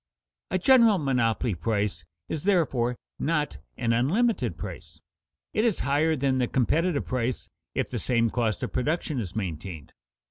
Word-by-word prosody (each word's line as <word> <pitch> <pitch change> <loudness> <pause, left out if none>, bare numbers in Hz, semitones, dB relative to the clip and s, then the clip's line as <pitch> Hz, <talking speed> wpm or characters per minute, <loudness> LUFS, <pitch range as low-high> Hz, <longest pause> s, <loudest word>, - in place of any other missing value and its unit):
A 185 - +1
general 230 0 +6
monopoly 125 - +1
price 100 0 -1 0.2
is 155 +2 -4
therefore 135 -11 +2 0.2
not 150 -1 -1 0.2
an 115 -2 +1
unlimited 135 - +1
price. 85 -3 -8 0.5
It 215 - +2
is 230 -5 +1
higher 150 +4 +2
than 135 -2 +1
the 125 - +2
competitive 155 +6 +1
price 125 -1 -2 0.3
if - - -1
the - - -2
same 115 -2 +1
cost 115 -5 -1
of - - -3
production 150 +1 -1
is 95 -6 -5
maintained. 85 -5 -5
125 Hz, 145 wpm, -27 LUFS, 110-160 Hz, 0.5 s, general